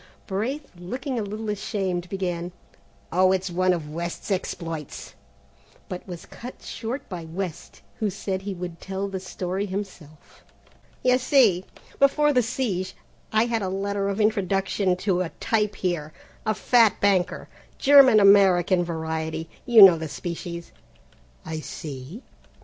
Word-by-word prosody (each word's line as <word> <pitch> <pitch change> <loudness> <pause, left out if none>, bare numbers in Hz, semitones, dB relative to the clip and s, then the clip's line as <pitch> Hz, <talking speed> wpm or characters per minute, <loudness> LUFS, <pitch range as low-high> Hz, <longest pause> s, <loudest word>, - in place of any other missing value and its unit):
Braith, 245 +10 -3
looking 245 - -4
a - - -1
little 215 +2 -5
ashamed, 190 -4 -3
began, 180 -2 -3 0.6
"Oh, 185 +2 +4
it's 190 -1 0
one 185 +1 +2
of 160 -4 -3
West's 170 +4 -5
exploits," 165 -5 -4 0.7
but 180 +1 -7
was 175 -2 -8
cut 250 +2 -10
short 235 +4 -5
by 175 -4 -6
West, 170 +1 -6 0.2
who 215 - +1
said 190 0 -3
he 195 0 -5
would 175 -2 -6
tell 195 +1 -3
the 195 -1 -4
story 185 +1 -3
himself. 185 -6 -8 0.6
"You 255 0 +4
see, 235 -9 +4 0.3
before 295 +2 +4
the 250 - +4
siege, 210 -6 -2 0.4
I 220 +1 +3
had 230 -2 -1
a 190 - -2
letter 200 +1 -1
of 200 +2 -3
introduction 195 -2 +1
to 185 -3 +2
a 175 - -2
'type' 210 -2 0
here, 165 -5 -2 0.3
a 215 - +2
fat 230 -2 +4
banker, 195 -3 +1 0.3
German 270 -5 +7
American 190 -3 +5
variety. 160 -1 -4 0.2
You 230 -4 +9
know 180 -4 +8
the 160 -1 -5
species, 170 +2 -6 0.7
I 160 0 -4
see. 150 - -8
190 Hz, 140 wpm, -25 LUFS, 175-215 Hz, 0.7 s, You